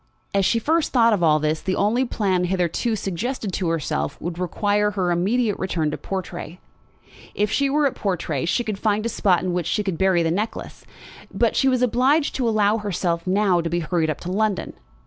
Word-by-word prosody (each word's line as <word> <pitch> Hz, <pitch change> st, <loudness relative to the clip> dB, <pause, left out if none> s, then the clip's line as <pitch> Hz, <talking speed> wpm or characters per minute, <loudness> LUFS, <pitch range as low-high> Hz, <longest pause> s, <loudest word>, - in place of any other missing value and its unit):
As 195 Hz, -1 st, +2 dB
she 230 Hz, -, +2 dB
first 315 Hz, +7 st, +1 dB
thought 230 Hz, -3 st, +4 dB
of 200 Hz, -, 0 dB
all 155 Hz, -2 st, +4 dB
this, 155 Hz, +1 st, -1 dB
the 185 Hz, -, -1 dB
only 230 Hz, +6 st, +1 dB
plan 190 Hz, -6 st, 0 dB
hitherto 185 Hz, +5 st, 0 dB
suggested 205 Hz, +2 st, -3 dB
to 180 Hz, -2 st, -1 dB
herself 160 Hz, -3 st, -2 dB
would 175 Hz, 0 st, -5 dB
require 205 Hz, +3 st, +1 dB
her 190 Hz, -4 st, -1 dB
immediate 205 Hz, +5 st, +1 dB
return 165 Hz, -5 st, -1 dB
to -, -, -4 dB
Portray. 180 Hz, -2 st, -6 dB, 0.8 s
If 210 Hz, 0 st, 0 dB
she 280 Hz, -1 st, +1 dB
were 295 Hz, +1 st, +2 dB
at 275 Hz, -, +1 dB
Portray 165 Hz, -8 st, -2 dB
she 175 Hz, +8 st, 0 dB
could 215 Hz, -4 st, -4 dB
find 215 Hz, 0 st, 0 dB
a -, -, 0 dB
spot 185 Hz, -5 st, +2 dB
in 185 Hz, -1 st, -1 dB
which 175 Hz, -3 st, -1 dB
she 210 Hz, -, 0 dB
could 190 Hz, -5 st, -3 dB
bury 190 Hz, -3 st, +3 dB
the 165 Hz, -, 0 dB
necklace. 210 Hz, +6 st, -4 dB, 0.5 s
But -, -, +1 dB
she 270 Hz, -, +3 dB
was 255 Hz, -1 st, +1 dB
obliged 260 Hz, +6 st, +2 dB
to 245 Hz, -3 st, +1 dB
allow 215 Hz, 0 st, +2 dB
herself 180 Hz, -4 st, -2 dB
now 190 Hz, -2 st, +2 dB
to 165 Hz, -, -3 dB
be 170 Hz, +1 st, -1 dB
hurried 160 Hz, 0 st, 0 dB
up 155 Hz, -, -2 dB
to 180 Hz, -, -5 dB
London. 210 Hz, 0 st, -1 dB
195 Hz, 205 wpm, -22 LUFS, 175-220 Hz, 0.8 s, thought